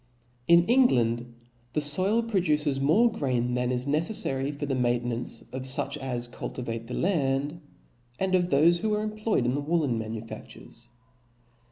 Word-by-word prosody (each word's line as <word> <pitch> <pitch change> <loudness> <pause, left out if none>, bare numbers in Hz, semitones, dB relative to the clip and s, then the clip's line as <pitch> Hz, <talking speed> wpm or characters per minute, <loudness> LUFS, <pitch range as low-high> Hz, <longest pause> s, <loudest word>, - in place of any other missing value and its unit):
In 170 0 +6
England 120 - +2 0.4
the - - +1
foil 185 +10 +2
produces 155 -10 0
more 210 +12 +4
grain 125 - -1
than 125 0 0
is 125 0 -2
neceffary 145 -3 0
for 145 0 -5
the 140 - -2
maintenance 120 -2 -2
of 130 - -5
fuch 135 +2 +1
as 125 -3 -3
cultivate 115 -1 -6
the 125 - -5
land, 145 -3 0 0.6
and 190 -1 -1
of 180 -1 +3
thofe 170 +2 +4
who 215 +3 0
are 210 - -1
employed 215 - -1
in 125 - +1
the 145 - -1
woollen 145 -6 0
manufaftures. 115 +1 -9
140 Hz, 150 wpm, -27 LUFS, 125-175 Hz, 0.6 s, In